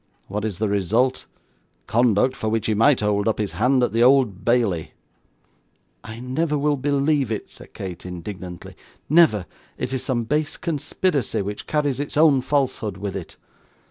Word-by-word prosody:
What 105 +2 -4
is 105 -5 -3
the 110 +2 0
result? 110 +6 +1 0.6
Conduct 120 +2 +2
for 110 - -2
which 110 -1 -1
he 110 - +1
might 115 +5 +4
hold 105 0 +1
up 110 - +1
his 105 -2 -2
hand 125 +3 +2
at - - +1
the 115 - +1
Old 125 -6 +4
Bailey.' 115 -9 +1 1.1
'I 110 +2 -8
never 150 +5 -1
will 145 +1 +1
believe 140 -1 +1
it,' 110 - -4
said - - -15
Kate, 90 -3 -7
indignantly; 90 0 -8 0.3
'never. 150 - +4 0.3
It 125 - -3
is 130 - -1
some 125 -3 -1
base 150 +5 -1
conspiracy, 150 - -1
which 105 +1 -6
carries 145 -4 0
its 145 0 -4
own 150 -4 +5
falsehood 130 -7 -1
with 100 0 -5
it. 95 -4 -7
120 Hz, 165 wpm, -23 LUFS, 105-140 Hz, 1.1 s, own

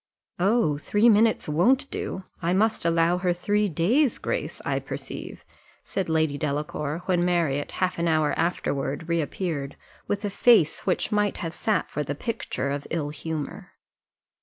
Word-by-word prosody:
Oh, 190 -6 +2
three 210 +9 +3
minutes 220 +1 +4
won't 245 - +3
do; 190 - -4 0.2
I 170 +1 +1
must 215 0 +1
allow 170 +1 +3
her 180 -1 +1
three 205 +4 +1
days' 225 - +2
grace, - - -3
I - - 0
perceive," - - -7 0.4
said 190 -3 -3
Lady 160 -3 +1
Delacour 150 +2 -2
when 180 -2 +2
Marriott 165 -5 0
half 185 -2 -1
an 170 - +1
hour 155 -2 +2
afterward 150 -3 -1
reappeared, 160 -3 -2 0.3
with 205 +1 -2
a 205 - -2
face 205 -8 +4
which 185 - 0
might 210 -1 +1
have 165 -1 -4
sat 215 +4 -1
for 150 - -2
the 145 0 -3
picture 140 - -3
of 140 0 -4
ill 155 -3 -2
humour. 155 0 -6
170 Hz, 155 wpm, -26 LUFS, 150-205 Hz, 0.4 s, minutes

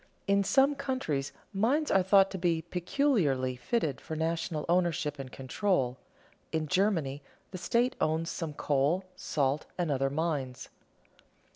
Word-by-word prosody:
In 200 0 +3
some 270 +7 +4
countries 260 - -2 0.2
mines 255 +10 +1
are 195 - +5
thought 195 +1 +5
to 190 - -4
be 170 -2 +1
peculiarly 175 - +1
fitted 140 - -1
for 160 - -5
national 160 0 -1
ownership 170 -4 +1
and 130 -2 -6
control. 130 -2 -1 0.5
In 160 -1 -1
Germany, 165 -7 +1 0.3
the 185 - -6
state 240 +7 +1
owns 160 +1 +1
some 160 -4 -4
coal, 145 +8 +1
salt, 150 -6 -1
and 175 -4 0
other 135 0 +1
mines. 140 -4 -2
165 Hz, 135 wpm, -30 LUFS, 140-195 Hz, 0.5 s, are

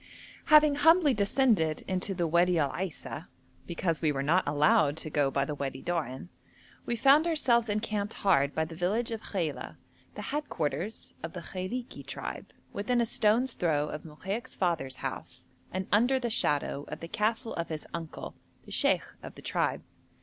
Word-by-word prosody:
Having 300 -1 +6
humbly 320 -1 +5
descended 200 - +2
into 190 +1 -1
the 175 -1 0
Wadi 170 +2 +3
Al 145 -4 +2
Aisa, 180 -2 -5 0.4
because 170 -2 -1
we 155 -2 +3
were 135 -1 -2
not 170 +6 +3
allowed 145 0 +3
to 155 -1 -5
go 145 -2 +2
by 140 +1 0
the 150 - -3
Wadi 135 -2 -4
Doan, 160 -4 -3 0.6
we 240 - 0
found 280 +7 +5
ourselves 245 -8 +2
encamped 210 0 -1
hard 145 -8 +2
by 160 - +1
the 160 - -9
village 200 +8 0
of 225 -1 -3
Khaila, 170 -10 -3 0.4
the - - -6
head 295 0 -3
quarters 160 +7 -3
of - - -6
the - - -6
Khailiki 225 +7 -5
tribe, - - -6 0.2
within 240 +4 0
a 235 - +3
stone's 230 +3 +2
throw 150 -3 0
of 150 - -5
Mokaik's 195 +10 -5
father's 165 -8 -1
house - - -6 0.3
and 185 0 -2
under 240 +6 +4
the 240 -2 -2
shadow 145 -7 +1
of 150 - -6
the 165 - -7
castle 220 +5 -1
of 170 - -3
his 155 -2 -5
uncle, 165 -2 -6 0.3
the - - -12
sheikh - - +2 0.2
of - - -9
the - - -12
tribe. - - 0
185 Hz, 175 wpm, -29 LUFS, 155-230 Hz, 0.6 s, Having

